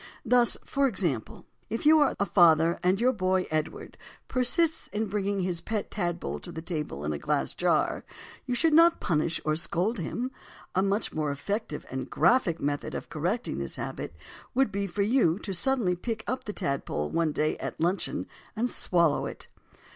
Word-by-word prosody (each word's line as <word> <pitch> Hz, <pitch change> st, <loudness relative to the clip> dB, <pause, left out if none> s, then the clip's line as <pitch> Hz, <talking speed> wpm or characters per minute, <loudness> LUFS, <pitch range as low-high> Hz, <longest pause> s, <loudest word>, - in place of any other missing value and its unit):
Thus, 245 Hz, -1 st, +4 dB
for 275 Hz, 0 st, +2 dB
example, 170 Hz, -, -2 dB, 0.2 s
if 225 Hz, -, -3 dB
you 310 Hz, +1 st, +7 dB
are 290 Hz, -, +3 dB
a 200 Hz, -, +2 dB
father 170 Hz, -3 st, +5 dB
and 185 Hz, +2 st, +2 dB
your 255 Hz, +2 st, +3 dB
boy 185 Hz, -3 st, +1 dB
Edward 155 Hz, 0 st, -3 dB, 0.3 s
persists 280 Hz, +6 st, +1 dB
in 215 Hz, +2 st, -2 dB
bringing 200 Hz, -1 st, -1 dB
his 180 Hz, -2 st, -2 dB
pet 215 Hz, -2 st, -3 dB
tadpole 175 Hz, -4 st, -2 dB
to 175 Hz, -, -10 dB
the 160 Hz, -, -6 dB
table 150 Hz, -, -4 dB
in 75 Hz, -, -1 dB
a 75 Hz, -, -4 dB
glass 75 Hz, -, 0 dB
jar, -, -, +1 dB, 0.4 s
you 250 Hz, -, 0 dB
should 320 Hz, +5 st, +3 dB
not 335 Hz, +2 st, +6 dB
punish 165 Hz, -1 st, 0 dB
or 155 Hz, 0 st, +2 dB
scold 180 Hz, +7 st, -1 dB
him; 240 Hz, +10 st, -3 dB, 0.4 s
a 190 Hz, -, +2 dB
much 200 Hz, +2 st, 0 dB
more 155 Hz, -1 st, -1 dB
effective 150 Hz, +3 st, -3 dB
and 130 Hz, 0 st, -4 dB
graphic 200 Hz, -10 st, +3 dB
method 145 Hz, 0 st, -2 dB
of -, -, -6 dB
correcting 180 Hz, +11 st, -2 dB
this -, -, -5 dB
habit -, -, -5 dB, 0.4 s
would 265 Hz, -4 st, +3 dB
be 200 Hz, 0 st, -1 dB
for 200 Hz, +2 st, -1 dB
you 205 Hz, -7 st, +3 dB
to 200 Hz, -1 st, -5 dB
suddenly 205 Hz, -1 st, +1 dB
pick 220 Hz, +4 st, -4 dB
up 255 Hz, 0 st, -3 dB
the 210 Hz, -, -3 dB
tadpole 140 Hz, -, -2 dB
one 165 Hz, -2 st, +1 dB
day 155 Hz, +1 st, 0 dB
at -, -, -5 dB
luncheon 175 Hz, +4 st, 0 dB, 0.3 s
and 240 Hz, +3 st, 0 dB
swallow 170 Hz, -5 st, +2 dB
it. -, -, -7 dB
190 Hz, 180 wpm, -28 LUFS, 160-230 Hz, 0.4 s, you